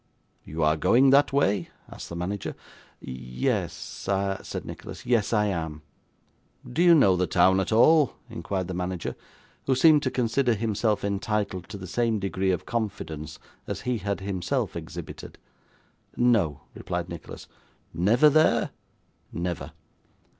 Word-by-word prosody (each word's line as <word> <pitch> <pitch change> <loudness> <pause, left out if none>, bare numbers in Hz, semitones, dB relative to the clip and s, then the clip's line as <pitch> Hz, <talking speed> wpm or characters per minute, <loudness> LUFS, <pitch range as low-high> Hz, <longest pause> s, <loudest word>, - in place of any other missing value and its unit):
'You 80 +1 -3
are 75 +1 +3
going 130 - +4
that 140 +1 +5
way?' 100 -10 +1 0.2
asked - - -9
the 85 - -6
manager. 90 +3 -4 0.5
'Ye 65 - -7
yes,' 60 0 -3 0.3
said - - -6
Nicholas. - - -9
'Yes, 115 -5 +2
I 105 -2 +3
am.' 80 -6 -3 0.8
'Do 130 +7 -1
you 175 -1 +7
know 100 - +5
the 90 0 0
town 95 +1 +4
at 95 - -1
all?' 150 +6 +5
inquired 95 -2 -4
the 95 - -4
manager, 90 0 -3 0.5
who 135 - +3
seemed 150 +2 +6
to 130 - 0
consider 125 0 +1
himself 110 0 0
entitled 100 -2 -2
to 105 - -6
the 95 - -8
same 115 +4 0
degree 95 -1 -1
of 90 - -1
confidence 100 -10 -4 0.3
as - - -4
he 125 -2 -1
had 100 -1 -3
himself 95 -3 -2
exhibited. - - -8 0.8
'No,' 115 - +2
replied - - -4
Nicholas. - - -9 0.5
'Never 105 - +4
there?' 155 +2 +3 0.6
'Never. 85 -4 -4
100 Hz, 140 wpm, -26 LUFS, 90-120 Hz, 0.8 s, you